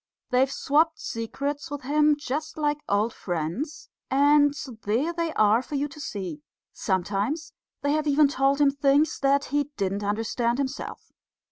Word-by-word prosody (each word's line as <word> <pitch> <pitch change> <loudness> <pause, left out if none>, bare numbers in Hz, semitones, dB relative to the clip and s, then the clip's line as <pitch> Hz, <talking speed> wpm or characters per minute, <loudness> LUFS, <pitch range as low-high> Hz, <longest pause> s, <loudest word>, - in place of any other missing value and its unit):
They've 260 +2 +3
swopped 315 +4 +2
secrets 275 +6 -4
with 290 -1 -6
him 300 +2 +3
just 295 +3 -4
like 295 -1 0
old 210 +3 +1
friends; 175 - -4 0.2
and 290 +1 +5 0.3
there 250 +11 0
they 335 -1 -1
are 215 +2 +4
for 285 - -7
you 285 +1 0
to 280 - -12
see. 185 - -5 0.3
Sometimes 205 - -1 0.3
they 285 - +2
have 305 0 0
even 290 0 +5
told 275 0 +1
him 285 -1 +5
things 280 +2 +2
that 280 +1 +2
he 290 0 +2
didn't 200 0 -1
understand 225 +3 0
himself. 275 0 -5
275 Hz, 150 wpm, -26 LUFS, 225-295 Hz, 0.3 s, and